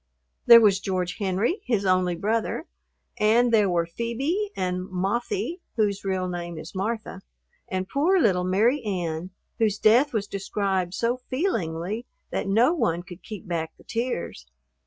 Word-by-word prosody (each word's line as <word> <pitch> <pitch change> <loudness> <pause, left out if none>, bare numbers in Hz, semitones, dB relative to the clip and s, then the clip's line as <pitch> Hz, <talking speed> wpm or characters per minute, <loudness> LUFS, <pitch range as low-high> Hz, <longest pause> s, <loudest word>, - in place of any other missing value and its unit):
There 235 -1 +11
was 200 -3 +4
George 185 -2 -2
Henry, 200 - 0
his 220 -5 0
only 185 -1 +2
brother; 225 - -1 0.5
and 230 +3 +4
there 210 -3 +4
were 170 -1 +1
Phoebe 265 - -2
and 180 0 -2
"Mothie," 240 - -2 0.2
whose 205 -3 0
real 190 -1 -1
name 175 -1 -5
is 160 - -8
Martha; 210 0 -3 0.5
and 185 0 -3
poor 315 - +2
little 185 - +3
Mary 220 +10 +2
Ann, 175 -4 -3 0.3
whose 215 -3 +2
death 240 +8 +4
was 215 -3 -1
described 195 -2 -2
so 240 +2 0
feelingly 215 - -2 0.2
that - - -2
no 230 - +4
one 175 - 0
could 175 0 -11
keep 210 +3 -9
back 165 -2 -3
the - - -19
tears. 230 - -3
200 Hz, 150 wpm, -25 LUFS, 180-235 Hz, 0.5 s, There